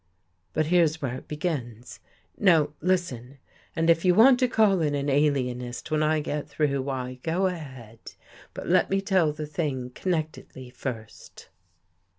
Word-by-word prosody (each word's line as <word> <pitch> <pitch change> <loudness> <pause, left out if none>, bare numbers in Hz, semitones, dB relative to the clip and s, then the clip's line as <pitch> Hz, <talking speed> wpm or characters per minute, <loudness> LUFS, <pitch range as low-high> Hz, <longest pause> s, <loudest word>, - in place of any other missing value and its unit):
But 155 - +1
here's 160 -1 +2
where 135 -5 -3
it 130 - -9
begins. 130 -7 -5 0.4
Now 165 -7 +3
listen, 145 -8 -2 0.4
and 165 0 0
if 165 0 +4
you 180 -1 +4
want 245 +4 +6
to 255 - +3
call 210 -6 +3
in 150 -2 0
an 140 0 -1
alienist 130 -3 -1
when 155 0 +1
I 155 0 +2
get 150 0 -4
through, 140 -1 0
why, 130 -2 -4
go 170 +6 0
ahead. 130 - -6 0.6
But - - -6
let - - +3
me 195 - +1
tell 190 -5 +2
the 150 +1 -6
thing 145 -5 -3
connectedly 155 -7 -4
first. 115 -3 -8
150 Hz, 155 wpm, -26 LUFS, 130-170 Hz, 0.6 s, want